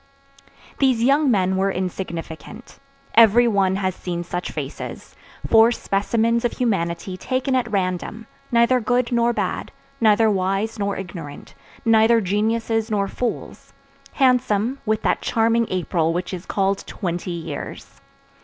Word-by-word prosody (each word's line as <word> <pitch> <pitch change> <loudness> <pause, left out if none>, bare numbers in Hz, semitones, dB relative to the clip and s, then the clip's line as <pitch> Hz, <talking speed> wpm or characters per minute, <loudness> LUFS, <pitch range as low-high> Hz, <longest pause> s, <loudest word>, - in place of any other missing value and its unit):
These 255 -4 +3
young 280 +3 +3
men 190 -4 +2
were 195 +1 +1
insignificant; 180 +2 -6 0.3
every 230 +2 +6
one 195 -4 +2
has 190 -1 -1
seen 175 -1 -4
such 175 +1 -4
faces; - - -7 0.3
four 225 +1 +6
specimens 230 +2 0
of 240 - 0
humanity 185 -5 -1
taken 260 +5 -1
at 250 -2 +1
random; 190 +3 -2 0.3
neither 235 +2 +4
good 245 +1 0
nor 235 0 +2
bad, - - -3 0.3
neither 220 0 +4
wise 195 +2 -1
nor 200 0 -1
ignorant, 170 -6 -8 0.3
neither 225 +1 +5
geniuses 225 +3 0
nor 200 -2 0
fools; 245 +4 -5 0.4
handsome, 250 -2 +2
with 215 0 0
that - - +1
charming 230 0 +1
April 170 -3 0
which 180 +2 -3
is 180 0 -7
called 195 0 0
twenty 175 -1 -4
years. 170 -2 -7
215 Hz, 130 wpm, -22 LUFS, 185-235 Hz, 0.4 s, every